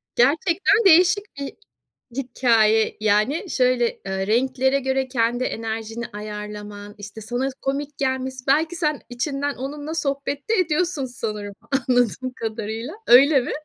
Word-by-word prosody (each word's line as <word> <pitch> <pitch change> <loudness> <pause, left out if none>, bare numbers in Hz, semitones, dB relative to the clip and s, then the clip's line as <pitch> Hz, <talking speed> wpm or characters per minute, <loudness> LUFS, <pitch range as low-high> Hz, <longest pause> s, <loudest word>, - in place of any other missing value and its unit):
Gerçekten 335 - +3
değişik 365 +3 +6 0.2
bir 280 - -5 0.6
hikâye 230 -4 +2
yani 215 - +1
şöyle, 250 -3 +1
ııı 190 0 -2
renklere 265 +4 +2
göre 265 0 -1
kendi 245 0 0
enerjini 225 0 -4
ayarlaman, 210 0 -7
işte 205 +2 -9
sana 245 +5 -2
komik 280 +1 -3
gelmesi, 260 -1 -2
belki 315 +5 +2
sen 305 -3 -1
içinden 275 +3 -2
onunla 290 +4 -5
sohbet 280 +2 -3
de - - +3
ediyorsun 335 -4 0
sanırım 210 -5 -5 0.2
anladığım 255 -1 +1
kadarıyla, 225 - -4
öyle 270 +3 +7
mi? 245 - -4
255 Hz, 125 wpm, -23 LUFS, 225-285 Hz, 0.6 s, öyle